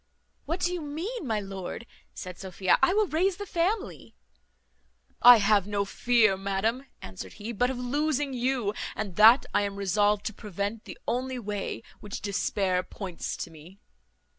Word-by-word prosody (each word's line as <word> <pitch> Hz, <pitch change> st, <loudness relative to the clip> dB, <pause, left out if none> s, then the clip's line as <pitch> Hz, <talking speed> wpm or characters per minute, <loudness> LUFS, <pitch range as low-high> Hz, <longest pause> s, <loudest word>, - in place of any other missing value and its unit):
"What 335 Hz, +5 st, -3 dB
do 350 Hz, -, +1 dB
you 355 Hz, -, -3 dB
mean, 325 Hz, -, -5 dB
my 220 Hz, -2 st, 0 dB
lord?" 195 Hz, +2 st, -6 dB, 0.3 s
said 180 Hz, -2 st, -7 dB
Sophia; 185 Hz, -1 st, +1 dB
"I -, -, +5 dB
will 425 Hz, +2 st, +3 dB
raise 360 Hz, +2 st, +1 dB
the 410 Hz, -, -5 dB
family." 385 Hz, +4 st, -2 dB, 1.1 s
"I 245 Hz, 0 st, +10 dB
have 205 Hz, -2 st, +3 dB
no 200 Hz, -1 st, 0 dB
fear, 220 Hz, -1 st, +3 dB
madam," 200 Hz, +7 st, -1 dB, 0.2 s
answered 95 Hz, 0 st, -8 dB
he, 215 Hz, +3 st, -6 dB
"but 245 Hz, +3 st, +1 dB
of 260 Hz, -, -3 dB
losing 285 Hz, +2 st, -1 dB
you, 245 Hz, -4 st, 0 dB, 0.2 s
and 200 Hz, -5 st, -4 dB
that 225 Hz, +5 st, +8 dB
I 205 Hz, -, +3 dB
am 200 Hz, -1 st, -2 dB
resolved 205 Hz, +1 st, +1 dB
to 220 Hz, -, -2 dB
prevent, 205 Hz, +1 st, -4 dB
the -, -, -9 dB
only 255 Hz, +2 st, -1 dB
way 210 Hz, -2 st, -4 dB, 0.2 s
which 205 Hz, -1 st, -6 dB
despair 195 Hz, -2 st, 0 dB
points 185 Hz, -1 st, -6 dB
to 170 Hz, -, -6 dB
me." 165 Hz, +5 st, -14 dB
215 Hz, 165 wpm, -28 LUFS, 200-265 Hz, 1.1 s, I